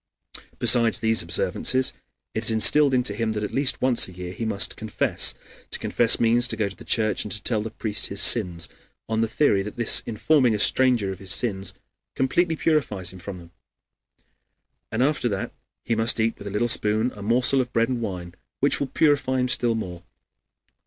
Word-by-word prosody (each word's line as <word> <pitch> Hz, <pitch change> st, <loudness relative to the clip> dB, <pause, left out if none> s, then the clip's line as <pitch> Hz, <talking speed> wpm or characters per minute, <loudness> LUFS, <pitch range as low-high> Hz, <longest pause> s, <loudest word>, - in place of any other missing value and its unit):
Besides 115 Hz, -2 st, +2 dB
these 110 Hz, 0 st, +3 dB
observances, 130 Hz, +9 st, +1 dB, 0.4 s
it 110 Hz, -, -3 dB
is -, -, +6 dB
instilled 135 Hz, +5 st, +4 dB
into 125 Hz, -5 st, 0 dB
him 110 Hz, +1 st, -2 dB
that 105 Hz, -1 st, -4 dB
at 105 Hz, -, -5 dB
least 135 Hz, +1 st, +1 dB
once 130 Hz, -2 st, +4 dB
a -, -, -12 dB
year 90 Hz, 0 st, -8 dB
he 115 Hz, -, -5 dB
must 105 Hz, -2 st, 0 dB
confess. 110 Hz, -2 st, +1 dB, 0.3 s
To -, -, -1 dB
confess 115 Hz, -2 st, +2 dB
means 120 Hz, +2 st, +3 dB
to 110 Hz, -, 0 dB
go 105 Hz, -2 st, -1 dB
to 95 Hz, -, -12 dB
the -, -, -14 dB
church 110 Hz, -3 st, 0 dB
and 105 Hz, -, -8 dB
to 105 Hz, -, -2 dB
tell 110 Hz, -3 st, 0 dB
the 110 Hz, -, -5 dB
priest 110 Hz, -1 st, 0 dB
his 100 Hz, -, -4 dB
sins, 90 Hz, -9 st, +2 dB, 0.4 s
on 110 Hz, 0 st, -1 dB
the 115 Hz, -, 0 dB
theory 110 Hz, -5 st, +1 dB
that 105 Hz, +1 st, -8 dB
this 120 Hz, -2 st, +3 dB
informing 120 Hz, +1 st, +1 dB
a -, -, -4 dB
stranger 120 Hz, -3 st, +2 dB
of 95 Hz, -, -9 dB
his 95 Hz, -2 st, -5 dB
sins 95 Hz, -3 st, 0 dB, 0.4 s
completely 160 Hz, +6 st, 0 dB
purifies 115 Hz, -, -1 dB
him 95 Hz, -, -12 dB
from 95 Hz, +1 st, -8 dB
them. 85 Hz, -1 st, -15 dB, 1.4 s
And 115 Hz, +3 st, 0 dB
after 140 Hz, -3 st, 0 dB
that 100 Hz, -2 st, -4 dB, 0.3 s
he 115 Hz, -, -1 dB
must 115 Hz, +1 st, +1 dB
eat 115 Hz, +1 st, 0 dB
with 100 Hz, -, -9 dB
a -, -, -6 dB
little 105 Hz, +4 st, -1 dB
spoon 110 Hz, +1 st, +1 dB
a 105 Hz, -, -11 dB
morsel 125 Hz, +5 st, +3 dB
of 125 Hz, -1 st, -6 dB
bread 115 Hz, 0 st, 0 dB
with 125 Hz, -2 st, -2 dB
wine, 90 Hz, -6 st, -6 dB, 0.3 s
which 140 Hz, -, +2 dB
will 140 Hz, -, -2 dB
purify 140 Hz, -2 st, 0 dB
him 125 Hz, -, 0 dB
still 120 Hz, -3 st, +1 dB
more. 90 Hz, -6 st, -6 dB
110 Hz, 200 wpm, -23 LUFS, 100-125 Hz, 1.4 s, is